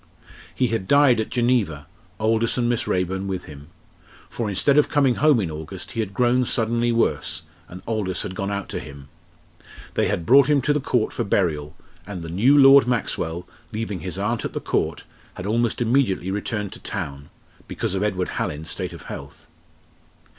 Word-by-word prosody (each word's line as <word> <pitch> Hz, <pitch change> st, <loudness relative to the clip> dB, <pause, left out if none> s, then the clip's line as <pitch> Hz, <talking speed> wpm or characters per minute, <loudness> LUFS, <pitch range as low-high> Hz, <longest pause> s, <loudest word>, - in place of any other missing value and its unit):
He 125 Hz, -2 st, +1 dB
had 110 Hz, -4 st, -2 dB
died 140 Hz, -5 st, +5 dB
at 110 Hz, -, -2 dB
Geneva, 120 Hz, -, 0 dB, 0.3 s
Aldous 115 Hz, +2 st, +2 dB
and 120 Hz, -1 st, +1 dB
Miss 120 Hz, -1 st, 0 dB
Raeburn 95 Hz, +1 st, -1 dB
with 95 Hz, -2 st, -3 dB
him. 75 Hz, -1 st, -12 dB, 0.6 s
For 115 Hz, -3 st, -3 dB
instead 140 Hz, +9 st, +3 dB
of 150 Hz, -, +2 dB
coming 140 Hz, -3 st, +3 dB
home 150 Hz, -1 st, +4 dB
in 90 Hz, -6 st, -2 dB
August, 75 Hz, 0 st, -7 dB
he -, -, -5 dB
had 105 Hz, -3 st, -1 dB
grown 125 Hz, +4 st, +2 dB
suddenly 120 Hz, 0 st, +1 dB
worse, 115 Hz, 0 st, 0 dB, 0.2 s
and 90 Hz, +2 st, -11 dB
Aldous 105 Hz, -5 st, -1 dB
had -, -, -5 dB
gone 100 Hz, +1 st, -3 dB
out 100 Hz, -1 st, -3 dB
to -, -, -3 dB
him. 70 Hz, -1 st, -11 dB, 0.8 s
They -, -, +1 dB
had 85 Hz, -, -2 dB
brought 135 Hz, +2 st, +6 dB
him 145 Hz, -1 st, +4 dB
to 145 Hz, -, +2 dB
the 150 Hz, -, +1 dB
Court 125 Hz, -4 st, 0 dB
for -, -, -1 dB
burial, 80 Hz, -6 st, 0 dB, 0.3 s
and 95 Hz, -4 st, -6 dB
the 80 Hz, -, -6 dB
new 115 Hz, -, +4 dB
Lord 135 Hz, -1 st, +8 dB
Maxwell, 90 Hz, -7 st, -1 dB, 0.2 s
leaving 110 Hz, -3 st, -4 dB
his 90 Hz, +1 st, -5 dB
aunt 110 Hz, +4 st, -1 dB
at -, -, -4 dB
the -, -, -2 dB
Court, -, -, -1 dB, 0.3 s
had 90 Hz, -, -7 dB
almost 115 Hz, +3 st, 0 dB
immediately 110 Hz, -7 st, +1 dB
returned 105 Hz, 0 st, -3 dB
to -, -, -10 dB
town, 70 Hz, -8 st, -6 dB, 0.4 s
because -, -, -3 dB
of 95 Hz, -, -1 dB
Edward 95 Hz, -3 st, -1 dB
Hallin's 75 Hz, +2 st, -3 dB
state -, -, -4 dB
of -, -, -10 dB
health. 70 Hz, 0 st, -9 dB
105 Hz, 185 wpm, -23 LUFS, 90-120 Hz, 0.8 s, Lord